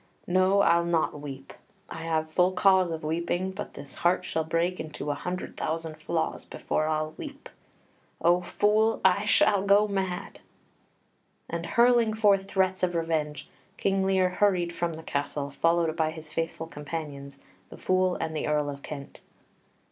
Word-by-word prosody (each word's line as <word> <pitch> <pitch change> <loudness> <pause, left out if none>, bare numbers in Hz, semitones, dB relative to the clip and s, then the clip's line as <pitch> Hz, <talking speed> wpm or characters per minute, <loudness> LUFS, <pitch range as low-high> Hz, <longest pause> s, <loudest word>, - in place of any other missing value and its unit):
No, 185 +2 +3
I'll 170 -3 +4
not 165 -3 0
weep. 135 -2 -8 0.3
I - - -8
have 160 -1 -1
full 180 +3 +3
cause 185 -1 +4
of 160 -1 -5
weeping; 170 +4 -1
but 195 +2 -7
this 140 0 -10
heart 180 +1 +2
shall 160 - -1
break 165 +3 -1
into 150 -1 -4
a - - 0
hundred 180 +5 -5
thousand 160 0 -3
flaws 165 0 -2
before 155 - -2
I'll 155 0 -1
weep.... 285 -2 -8 0.7
O 175 +1 +3
Fool, 215 +4 +2
I 190 +2 +4
shall 210 -2 +4
go 200 +2 +4
mad!" 190 -3 -3 1.1
And, 170 0 -4
hurling 235 0 +4
forth 200 -3 +3
threats 190 -1 +1
of 180 -1 0
revenge, 160 -3 -2 0.3
King 195 -1 +1
Lear 190 -1 +3
hurried 180 -2 +1
from 170 -1 -2
the 160 +1 -9
castle, 140 -1 -3
followed 165 +2 +1
by 160 -1 +1
his 155 -1 -9
faithful 165 0 -3
companions, 145 -3 -7 0.3
the - - -11
Fool 185 -1 +1
and 160 -1 -3
the 155 - -2
Earl 150 -1 +1
of 140 0 -9
Kent. 140 -2 -8
170 Hz, 160 wpm, -27 LUFS, 155-190 Hz, 1.1 s, I'll